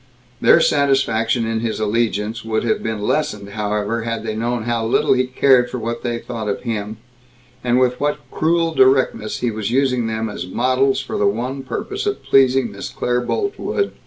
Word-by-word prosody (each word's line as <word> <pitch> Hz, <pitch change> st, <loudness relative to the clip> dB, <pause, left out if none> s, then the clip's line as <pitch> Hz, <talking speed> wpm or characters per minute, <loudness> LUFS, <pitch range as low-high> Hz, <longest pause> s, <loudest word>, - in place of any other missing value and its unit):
Their -, -, +6 dB
satisfaction 125 Hz, -5 st, +2 dB
in 115 Hz, 0 st, -1 dB
his 115 Hz, -1 st, -2 dB
allegiance 110 Hz, 0 st, -1 dB
would 110 Hz, -1 st, -1 dB
have 115 Hz, -, 0 dB
been 110 Hz, -2 st, -3 dB
lessened, 105 Hz, -6 st, -1 dB
however, 105 Hz, +2 st, -2 dB
had 115 Hz, 0 st, -3 dB
they 110 Hz, -1 st, -3 dB
known 120 Hz, +1 st, -1 dB
how 120 Hz, 0 st, -1 dB
little 110 Hz, -, +2 dB
he 130 Hz, 0 st, +1 dB
cared 130 Hz, -1 st, +3 dB
for 125 Hz, -, -4 dB
what 115 Hz, 0 st, -4 dB
they 120 Hz, -1 st, -2 dB
thought 115 Hz, -3 st, -5 dB
of 100 Hz, -, -2 dB
him, 110 Hz, -2 st, -3 dB, 0.7 s
and 125 Hz, 0 st, +2 dB
with 125 Hz, -1 st, +1 dB
what 145 Hz, 0 st, 0 dB
cruel 165 Hz, +1 st, +1 dB
directness 130 Hz, -6 st, +2 dB
he 120 Hz, -1 st, 0 dB
was 110 Hz, -1 st, -3 dB
using 125 Hz, -2 st, +1 dB
them 110 Hz, 0 st, -2 dB
as 90 Hz, -4 st, -6 dB
models 130 Hz, +6 st, +1 dB
for 130 Hz, -, -4 dB
the 100 Hz, -, +3 dB
one 125 Hz, +6 st, -2 dB
purpose 405 Hz, -, -4 dB
of 410 Hz, -, -2 dB
pleasing 130 Hz, -3 st, +3 dB
Miss 100 Hz, -, -7 dB
Claire 125 Hz, 0 st, -1 dB
Boltwood. 405 Hz, -, -2 dB
120 Hz, 185 wpm, -20 LUFS, 110-130 Hz, 0.7 s, Their